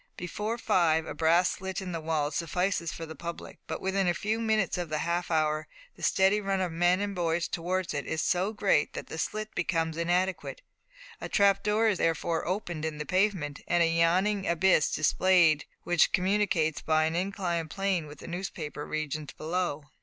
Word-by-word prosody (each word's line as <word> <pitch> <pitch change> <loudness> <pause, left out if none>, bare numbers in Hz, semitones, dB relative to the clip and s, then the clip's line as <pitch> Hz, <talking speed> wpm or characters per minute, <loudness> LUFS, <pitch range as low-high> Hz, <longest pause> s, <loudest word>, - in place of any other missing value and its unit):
Before 210 +6 -3
five 160 -7 +2
a - - -5
brass 170 +3 +3
slit 190 0 -4
in 190 -2 -5
the 165 -2 -4
wall 155 -2 -1
suffices 170 +2 -1
for 165 - -6
the 160 - -8
public, 170 +1 -8
but - - -4
within 190 0 0
a 175 - +2
few 215 +2 -1
minutes 220 -4 +1
of 175 -2 -3
the 155 - -1
half 170 +3 -1
hour 155 -1 +1 0.3
the - - -16
steady 195 +2 +3
run 195 -1 -1
of 185 -2 -1
men 175 +3 +2
and 205 0 -2
boys 170 -2 0
towards 180 +1 -2
it 140 - -3
is 160 - -2
so 185 +5 +1
great 200 -8 +1
that - - -6
the 160 - -6
slit 215 +6 -3
becomes 165 -3 -1
inadequate. 180 - -1 0.6
A - - -5
trap 200 -1 +4
door 215 +2 +2
is 205 -5 +1
therefore 165 0 0
opened 175 -4 -3
in 160 -1 -3
the 150 - -4
pavement, 185 -6 0
and 175 0 +3
a - - +3
yawning 190 +4 +2
abyss 170 -2 +3
displayed 160 -1 +3 0.2
which 175 -2 +3
communicates 185 -5 +1
by 155 0 +2
an 160 +1 -1
inclined 175 -3 -2
plane 195 -3 -1
with 145 - -11
the - - -11
newspaper 170 -4 -5
regions 155 -1 -4
below. 160 -2 -2
175 Hz, 190 wpm, -29 LUFS, 160-190 Hz, 0.6 s, trap